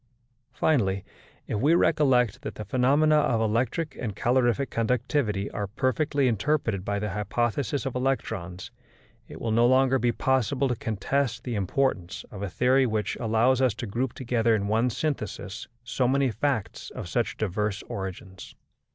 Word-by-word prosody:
Finally, 100 -10 +1 0.4
if 105 - -2
we 150 +8 +4
recollect 130 - +3
that - - -6
the 105 - -6
phenomena 145 +4 +3
of 120 -6 +2
electric 120 +7 0
and 105 -5 -4
calorific 125 +4 +1
conductivity 115 -3 0
are 105 - -3
perfectly 135 +6 0
interpreted 115 -3 0
by 100 +1 -1
the 105 0 -2
hypothesis 120 +7 -1
of 135 - -2
electrons, 110 -7 -3 0.6
it - - -10
will 115 - -2
no 115 +2 +4
longer 130 +1 +4
be 120 -1 +2
possible 130 +2 +1
to 125 - 0
contest 115 +4 -1
the 125 - -4
importance 100 -2 -1
of 100 - -8
a 100 - -3
theory 130 +6 +3
which 110 -2 -1
allows 120 +3 +2
us 125 -5 +2
to 120 - -5
group 120 +4 -2
together 115 -3 +1
in 100 -1 -1
one 115 +4 +2
synthesis 115 -6 -4 0.2
so 120 +2 0
many 135 0 +2
facts 115 0 -2
of - - -7
such - - -1
diverse 105 0 -2
origins. 95 -1 -7
120 Hz, 155 wpm, -26 LUFS, 105-130 Hz, 0.6 s, we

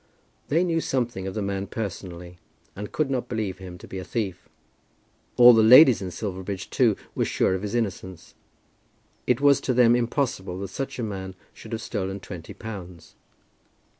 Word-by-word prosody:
They 165 +5 +2
knew 165 -2 0
something 120 -9 -2
of 95 - -5
the 105 - -2
man 100 0 -3
personally, 90 -4 -6 0.4
and 105 +2 -7
could 150 -3 -1
not 130 -2 -2
believe 105 -5 -3
him 90 -2 -9
to - - -13
be 95 - -6
a - - -6
thief. 100 -5 -4 0.9
All 120 0 +9
the 110 - +5
ladies 125 - +8
in 95 - -4
Silverbridge, 95 +1 -5
too, 115 -5 +3 0.2
were - - 0
sure - - +1
of 95 - -2
his 105 +2 -4
innocence. 95 -6 -4 0.9
It 125 +2 +2
was 145 -1 +5
to 130 - -1
them 120 -1 +5
impossible 120 -6 -1
that 100 - -5
such 135 +7 -5
a 120 - -3
man 95 -3 -5 0.2
should - - -13
have 115 - -3
stolen 95 -2 -3
twenty 90 -4 -9
pounds. 95 -7 -9
105 Hz, 175 wpm, -25 LUFS, 95-120 Hz, 0.9 s, All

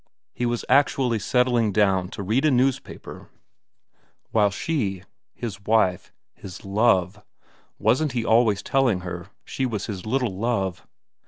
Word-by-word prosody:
He 120 - -1
was 120 0 -2
actually 130 -3 +2
settling 125 -2 +2
down 95 -2 +2
to 100 - -6
read 110 +8 +1
a 155 - +4
newspaper 130 0 -2 1.0
while 105 -2 +3
she, 100 - -2 0.3
his 105 -5 -6
wife, 100 -5 +1 0.2
his 95 0 -11
love 100 -1 +1 0.5
wasn't 145 +1 +1
he 120 -2 -1
always 110 -3 +3
telling 125 -9 +1
her 90 -1 -6 0.2
she 130 - -2
was 105 -4 -3
his 95 -5 -6
little 125 -4 0
Love 100 -4 -2
110 Hz, 135 wpm, -24 LUFS, 95-125 Hz, 1.0 s, a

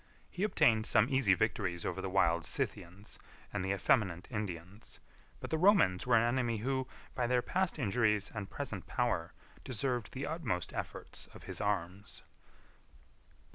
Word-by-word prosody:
He 180 - -6
obtained 110 - +3
some 115 +2 +4
easy 130 -9 +4
victories 95 -4 -1
over 95 +1 -2
the 95 - -3
wild 85 -3 +3
Scythians 90 +6 -4 0.3
and 105 -2 -1
the 95 - -2
effeminate 95 -2 +1
Indians; 100 -1 -6 0.4
but - - -7
the 160 - +1
Romans 155 - +4
were 125 - +5
an 115 - +5
enemy, 120 -1 +1
who, 130 +3 -1 0.3
by 120 - 0
their 125 0 +2
past 185 -2 0
injuries 105 -4 +1
and 105 -3 -5
present 105 -11 -5
power, 105 -9 0 0.3
deserved 125 -1 -2
the 135 +2 -3
utmost 150 - -2
efforts - - -6
of - - -12
his - - -5
arms. 100 -1 -2
110 Hz, 150 wpm, -33 LUFS, 95-125 Hz, 0.4 s, were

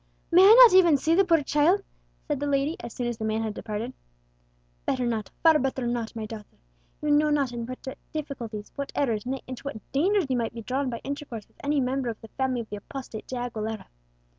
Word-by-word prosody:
"May 350 +2 +7
I 405 +4 +9
not 445 - +5
even 345 -6 +7
see 315 +4 +1
the 390 +3 +5
poor 330 -5 +3
child?" 315 +8 +3 0.4
said 295 -3 -1
the 290 - -2
lady, 285 +3 +1
as 235 - -7
soon 245 - -4
as 240 -2 -3
the - - -4
man 220 +1 0
had 220 -1 -3
departed. 220 +4 -5 0.9
"Better 255 -2 0
not, 225 -4 -2
far 320 -2 +6
better 265 -1 -1
not, 235 -1 -2
my 220 -1 -4
daughter. 215 -1 -10 0.5
You 300 - +1
know 300 +1 +4
not 285 -4 +1
into 240 0 -5
what 265 - -7
difficulties, 240 -9 -5
what 280 0 -4
errors, 235 -5 0
nay, 265 +1 -3
into 255 -1 -7
what 245 -7 -8
dangers 375 +6 +2
you 260 -2 0
might 230 -1 -2
be 230 - -6
drawn 260 +3 -1
by 235 -2 -5
intercourse 275 -6 -6
with - - -21
any 290 +1 +1
member 260 -1 0
of 225 - -5
the 225 - -12
family 260 -1 -1
of 225 - -10
the 210 - -4
apostate 225 0 -8
De 255 - -5
Aguilera." 225 -3 -4
260 Hz, 225 wpm, -26 LUFS, 230-290 Hz, 0.9 s, I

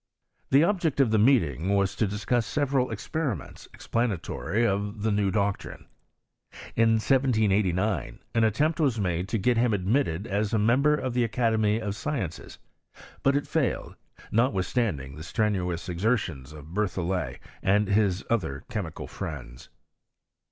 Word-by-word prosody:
The 140 +3 +5
object 170 -6 +1
of 130 -5 +4
the 110 - +3
meeting 100 - +3
was 100 -1 +1
to 110 - +2
discuss 110 +4 -1
several 140 -3 +1
experiments 115 - -4
explanatory 105 -1 -1
of 105 0 -1
the 110 - +2
new 100 -1 +2
doctrine. 100 0 -2 0.9
In 115 0 +4
1789 110 -5 +1 0.2
an 115 - +3
attempt 145 +10 +1
was 135 -8 +2
made 90 -2 -1
to 115 - 0
get 120 +4 +2
him 115 -2 +3
admitted 100 - 0
as 105 +2 -1
a - - +3
member 130 +8 +3
of 130 -4 -3
the 125 0 +2
Academy 110 -1 +1
of 105 -3 -3
Sciences; 140 - -4 0.6
but 135 +1 +3
it 145 - 0
failed, 155 -5 -1 0.4
notwithstanding 95 - 0
the - - -8
strenu 95 0 0
ous 85 0 -5
exertions 90 - -1
of 75 -1 -11
BerthoUet 90 -8 -1 0.2
and 105 +2 +2
his 100 -2 +2
other 80 -12 -1
chemical 100 -8 -4
friends. - - -7
105 Hz, 140 wpm, -27 LUFS, 95-120 Hz, 0.9 s, The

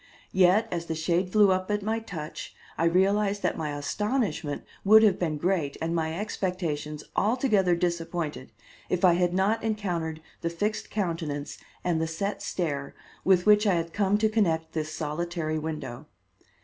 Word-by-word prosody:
Yet 190 +4 +4
as 170 -1 -3
the 160 - -2
shade 175 +3 0
flew 205 -2 +5
up 185 +1 0
at 210 -1 0
my 220 +2 0
touch 165 -9 -7 0.2
I 165 - 0
realized 200 +4 +2
that - - +1
my 150 -2 -3
astonishment 205 - -1 0.2
would 220 +2 +7
have 205 -4 +4
been 160 -4 -1
great 165 -3 0
and 165 +1 -2
my 160 +1 -1
expectations 165 -7 -3
altogether 210 -5 +2
disappointed 170 -4 -2 0.4
if 180 +1 +2
I 175 - +7
had 175 0 +2
not 210 +4 +1
encountered 175 -8 -2 0.2
the 170 - -1
fixed 205 +6 -2
countenance 165 -7 -3 0.2
and 170 -3 +1
the 160 - 0
set 195 +6 -3
stare 145 -6 -3 0.3
with 185 -2 +4
which 210 0 +5
I 190 - +4
had 165 0 -2
come 205 0 +2
to 220 +1 +3
connect 165 -7 +1
this 155 -1 -3
solitary 155 +1 -2
window. 155 -6 -5
175 Hz, 160 wpm, -27 LUFS, 160-205 Hz, 0.4 s, would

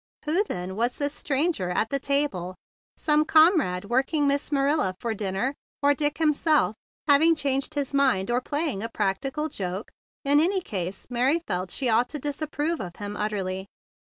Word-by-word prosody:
Who, 330 +7 +2
then, 180 - -5
was 240 +3 0
this 285 0 -1
stranger 290 - 0
at 215 +5 0
the 275 - 0
table? 275 -11 0 0.4
Some 300 0 +3
comrade 310 - +4
working 270 +6 +1
Miss 280 +1 0
Marilla 280 -8 +1
for 235 - -2
a - - -3
dinner, 200 +6 -2 0.3
or 285 0 +5
Dick 295 +1 0
himself, 305 -5 +2 0.3
having 315 +3 +5
changed 280 0 -1
his 285 -1 -2
mind 255 -8 +2
or 245 +1 +1
playing 290 -6 -2
a 230 - -3
practical 265 +9 -2
joke? 190 -5 -5 0.3
In 285 +1 +5
any 375 +5 +3
case 190 - -4
Mary 265 +7 +2
felt 180 +1 -2
she 260 +7 0
ought 235 +2 +3
to 300 - -4
disapprove 295 +3 -2
of 175 -3 -6
him 205 0 -6
utterly. 195 -3 -3
275 Hz, 170 wpm, -25 LUFS, 205-300 Hz, 0.4 s, or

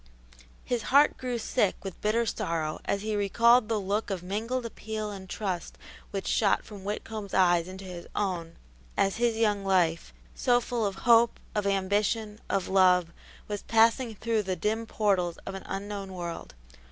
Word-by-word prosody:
His 245 -2 -1
heart 285 +3 +6
grew 250 -2 -3
sick 220 -2 +1
with 195 -3 -7
bitter 225 +3 +2
sorrow 165 -6 -2
as 200 0 -1
he 215 0 -1
recalled 230 +3 +4
the 220 -2 +1
look 205 +3 -1
of 190 -3 -3
mingled 225 +7 -2
appeal 215 -1 -5
and 190 -2 -9
trust 185 -5 -4 0.3
which 195 -1 -4
shot 205 -3 +2
from 205 -3 -10
Whitcomb's 210 0 -5
eyes 175 -2 +4
into 190 +1 -8
his 175 -2 -8
own 175 -5 -2 0.4
as 195 +1 +2
his 235 -1 +1
young 210 -3 +1
life, 175 -4 +1 0.2
so 245 -2 +3
full 235 -2 -1
of 195 - -4
hope, 235 -1 +5
of 210 -2 0
ambition, 205 +2 0
of 195 -2 0
love, 180 -3 +4 0.3
was 205 -1 -4
passing 230 +1 +3
through 225 +1 0
the 190 -2 -2
dim 220 +6 -1
portals 185 -6 +1
of 195 - -5
an 195 - -6
unknown 195 -1 -5
world. 170 - -6
205 Hz, 165 wpm, -28 LUFS, 190-225 Hz, 0.4 s, heart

